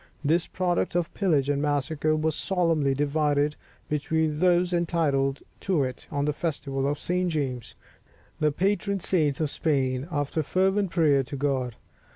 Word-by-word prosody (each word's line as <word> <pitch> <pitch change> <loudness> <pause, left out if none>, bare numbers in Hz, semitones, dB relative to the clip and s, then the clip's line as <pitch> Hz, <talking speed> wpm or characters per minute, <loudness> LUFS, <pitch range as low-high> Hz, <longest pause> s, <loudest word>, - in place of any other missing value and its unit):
This 165 +4 +2
product 180 -2 -1
of 175 -1 0
pillage 155 -9 +1
and 145 -1 0
massacre 150 +1 0
was 155 0 0
solemnly 165 -7 +1
divided 145 0 +1 0.3
between 150 +1 0
those 180 0 +3
entitled 150 -5 +1 0.2
to 180 -7 +1
it 130 -1 -5
on 140 0 -1
the 150 - 0
Festival 140 -4 -2
of 145 +1 -1
St. 180 +3 -1
James, 135 -7 -3 0.6
the 150 -1 +2
patron 200 +4 0
saint 155 -6 +1
of 155 -3 0
Spain, 135 -3 0
after 145 0 -1
fervent 190 +5 +1
prayer 150 -5 +3
to 140 +2 -6
God. 130 -4 -1
150 Hz, 150 wpm, -26 LUFS, 140-170 Hz, 0.6 s, those